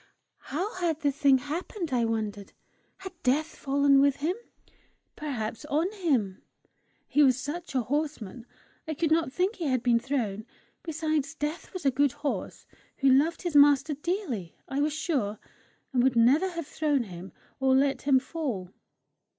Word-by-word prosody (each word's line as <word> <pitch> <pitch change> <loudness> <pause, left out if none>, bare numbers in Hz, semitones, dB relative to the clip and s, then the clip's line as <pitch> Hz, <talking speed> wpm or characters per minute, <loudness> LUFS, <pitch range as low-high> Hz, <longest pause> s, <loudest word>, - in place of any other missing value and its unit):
How 365 +9 -2
had 330 -3 -1
the 285 - +2
thing 275 -1 +4
happened, 320 +3 -4
I 240 -2 +2
wondered. 215 -3 -3 0.4
Had 380 0 -8
Death 275 +5 +2
fallen 275 0 +3
with 280 -1 +4
him 320 +6 -1 0.8
perhaps 235 -6 -4
on 315 +6 0
him? 270 - 0 0.7
He 295 - +3
was 260 -3 +5
such 315 +1 -6
a 255 - +2
horseman, 255 -5 -3 0.4
I 315 - -3
could 320 +1 0
not 320 -4 +2
think 370 - 0
he 345 - -3
had 255 -4 0
been 235 -2 +4
thrown. 230 -5 -2 0.3
Besides, 315 -2 -2
Death 300 +2 -4
was 370 -5 -7
a 275 - +5
good 280 +1 +2
horse 290 0 -4 0.3
who 275 - +3
loved 295 +7 +3
his 345 -4 -3
master 290 +1 +6
dearly, 290 - -3
I 270 - -2
was 300 +1 +2
sure, 275 - -1 0.6
and 250 - +3
would 260 0 +3
never 270 +11 +4
have 335 -3 -5
thrown 290 -3 0
him 185 -2 -9 0.3
or 265 -1 +3
let 275 +1 +2
him 275 -2 +4
fall! 255 - -4
285 Hz, 160 wpm, -28 LUFS, 250-315 Hz, 0.8 s, master